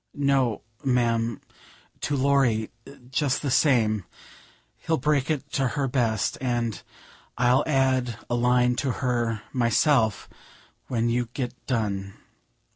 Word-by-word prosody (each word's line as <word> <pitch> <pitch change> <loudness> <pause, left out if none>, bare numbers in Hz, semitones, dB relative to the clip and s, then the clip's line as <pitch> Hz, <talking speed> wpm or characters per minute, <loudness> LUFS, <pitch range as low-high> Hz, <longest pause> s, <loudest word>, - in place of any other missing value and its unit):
"No, 135 -5 +1 0.2
ma'am; 115 -4 +1 0.6
to 145 - -1
Laurie 130 -5 +2 0.4
just 140 0 0
the 140 - -1
same; 110 - +3 0.7
he'll 160 - -1
break 145 +1 +1
it 145 -2 -2
to 135 -2 +1
her 140 -2 +1
best, 115 -5 0
and 120 -4 -1 0.6
I'll 125 +1 +3
add 130 -5 +1
a - - -3
line 125 0 +3
to 130 -2 0
her 120 -3 0
myself 120 - +2 0.6
when 120 -2 0
you 120 0 0
get 125 -3 -3
done." 100 -6 -2
125 Hz, 120 wpm, -25 LUFS, 115-135 Hz, 0.7 s, same